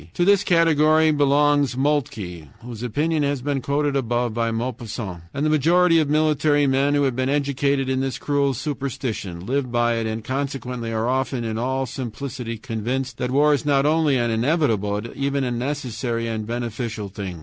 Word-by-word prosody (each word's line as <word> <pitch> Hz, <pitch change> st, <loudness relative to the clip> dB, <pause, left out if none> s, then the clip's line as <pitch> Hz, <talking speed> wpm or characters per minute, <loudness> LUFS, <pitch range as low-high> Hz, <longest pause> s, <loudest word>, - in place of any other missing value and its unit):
To 175 Hz, -, +2 dB
this 200 Hz, 0 st, +4 dB
category 160 Hz, -2 st, +4 dB
belongs 145 Hz, -2 st, +3 dB
Moltke, 110 Hz, -, -1 dB, 0.2 s
whose 120 Hz, -2 st, -8 dB
opinion 150 Hz, +7 st, 0 dB
has 140 Hz, -3 st, -1 dB
been 140 Hz, -1 st, -1 dB
quoted 145 Hz, +1 st, 0 dB
above 120 Hz, -2 st, 0 dB
by 115 Hz, 0 st, 0 dB
Maupassant, 115 Hz, -5 st, -4 dB
and 140 Hz, +2 st, -2 dB
the -, -, +2 dB
majority 165 Hz, +3 st, +4 dB
of 150 Hz, -3 st, +1 dB
military 150 Hz, -1 st, +3 dB
men, 140 Hz, +2 st, +2 dB
who 145 Hz, -, +2 dB
have 130 Hz, -3 st, +1 dB
been 130 Hz, +1 st, 0 dB
educated 140 Hz, -1 st, 0 dB
in 130 Hz, 0 st, 0 dB
this 135 Hz, -1 st, -2 dB
cruel 140 Hz, -2 st, 0 dB
superstition, 125 Hz, -, -4 dB
live 130 Hz, +1 st, -1 dB
by 120 Hz, -1 st, +2 dB
it, 115 Hz, -1 st, -1 dB
and 110 Hz, 0 st, -4 dB
consequently 130 Hz, -3 st, -3 dB
are 110 Hz, +1 st, -1 dB
often 130 Hz, -1 st, -1 dB
in 110 Hz, -1 st, -3 dB
all 130 Hz, +2 st, -1 dB
simplicity 125 Hz, -1 st, -5 dB
convinced 125 Hz, +2 st, -3 dB
that 125 Hz, -, -1 dB
war 145 Hz, +3 st, +4 dB
is 145 Hz, -, 0 dB
not 140 Hz, -2 st, +2 dB
only 155 Hz, -2 st, +3 dB
an 120 Hz, -1 st, 0 dB
inevitable, 110 Hz, -, +1 dB
but 115 Hz, -, -9 dB
even 140 Hz, 0 st, -1 dB
a 125 Hz, -, -1 dB
necessary 120 Hz, -2 st, -2 dB
and 110 Hz, -2 st, -3 dB
beneficial 115 Hz, -2 st, -4 dB
thing. 95 Hz, -3 st, -6 dB
130 Hz, 180 wpm, -22 LUFS, 115-145 Hz, 0.2 s, this